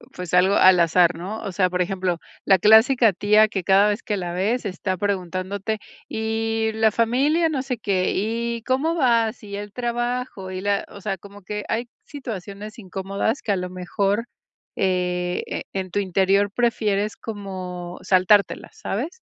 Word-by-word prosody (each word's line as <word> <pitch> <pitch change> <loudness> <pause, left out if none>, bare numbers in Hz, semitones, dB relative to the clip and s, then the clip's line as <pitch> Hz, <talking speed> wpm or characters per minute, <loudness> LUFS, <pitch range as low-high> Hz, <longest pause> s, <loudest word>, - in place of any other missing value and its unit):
pues, 180 -1 -3
algo 185 +2 +5
al 185 -1 +6
azar, 170 +1 +4
¿no? 190 +6 -6
O 200 - -4
sea, 185 0 +2
por 180 0 0
ejemplo, 180 -1 -1 0.3
la 190 -1 +5
clásica 220 +3 +6
tía 210 +3 +4
que 200 -4 -3
cada 195 +3 +5
vez 210 +2 -2
que 210 - -2
la 175 -2 -4
ves 210 +8 0
está 185 0 -2
preguntándote: 195 +2 -2 0.3
"¿Y 220 0 -1
la 220 0 +3
familia, 275 +10 +2
no 275 -4 -2
sé 255 -3 -3
qué, 190 -3 0
y 230 +3 -2
cómo 270 +7 0
vas? 235 -7 +2
¿Y 200 -2 -7
el 205 0 -7
trabajo? 240 -4 -3
Y 185 0 -5
la", 200 0 0
o 200 - -11
sea, 195 -1 -2
como 200 +2 -14
que 210 +2 -5
hay 235 +2 -2
situaciones 215 - -7
incómodas 195 +3 -3
que 210 - -2
a - - +3
lo 180 -1 -4
mejor, 195 +4 -1 0.5
eh, 180 -1 -1
en 190 -1 -3
tu 180 - -4
interior 195 +1 +2
prefieres 215 -3 0
como 185 -4 -6
saltártelas, 190 +2 +2
¿sabes? 320 - -4
205 Hz, 165 wpm, -23 LUFS, 185-225 Hz, 0.5 s, al